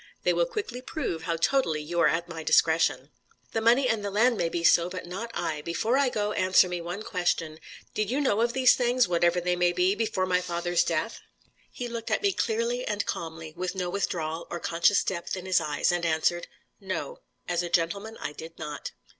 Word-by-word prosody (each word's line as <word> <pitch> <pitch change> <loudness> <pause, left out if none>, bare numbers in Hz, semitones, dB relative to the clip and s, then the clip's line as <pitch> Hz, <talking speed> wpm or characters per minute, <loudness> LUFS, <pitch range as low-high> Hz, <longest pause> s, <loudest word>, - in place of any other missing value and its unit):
They - - +3
will - - +2
quickly 395 - -5
prove 255 - -4
how 170 - 0
totally 165 - +1
you 165 +3 -3
are - - +5
at 170 +1 0
my 165 -1 -7
discretion." 160 -3 +2 0.4
"The 225 - 0
money 240 +4 +4
and 225 -3 0
the 200 - -2
land 230 +5 +3
may 170 -5 0
be 170 0 -3
so, 170 +1 +5
but 180 -1 -6
not 190 +7 -5
I. 155 -2 -2
Before 195 +10 0
I 275 -1 +3
go, 210 -3 -1
answer 185 -2 +4
me 180 -1 -4
one 175 +5 -5
question. 170 -5 -1 0.3
Did 215 -1 -1
you 260 +4 0
know 230 -7 +2
of 235 0 +1
these 260 -1 +6
things, 245 -2 +2
whatever 175 0 +2
they 180 0 0
may 175 0 +2
be, 180 +2 +2
before 210 -3 -1
my 180 -1 +1
father's 175 0 0
death?" 170 +7 -2 0.5
He 245 - -5
looked 230 -1 -5
at - - 0
me 400 -1 +3
clearly 235 -1 -1
and 205 -3 -2
calmly, 160 -1 -5
with 185 +2 -3
no 180 -2 -2
withdrawal, 170 -4 -2
or 175 - -4
conscious 170 +5 +2
depth 180 0 -3
in 185 - -7
his 185 -2 +3
eyes, 150 0 0
and 175 -1 -1
answered: 170 +1 +1 0.3
"No. - - -5 0.3
As 175 -1 0
a 175 - -4
gentleman, 200 +7 -1
I 145 - -4
did 160 +2 -10
not." 150 -2 -6
180 Hz, 215 wpm, -27 LUFS, 170-225 Hz, 0.5 s, these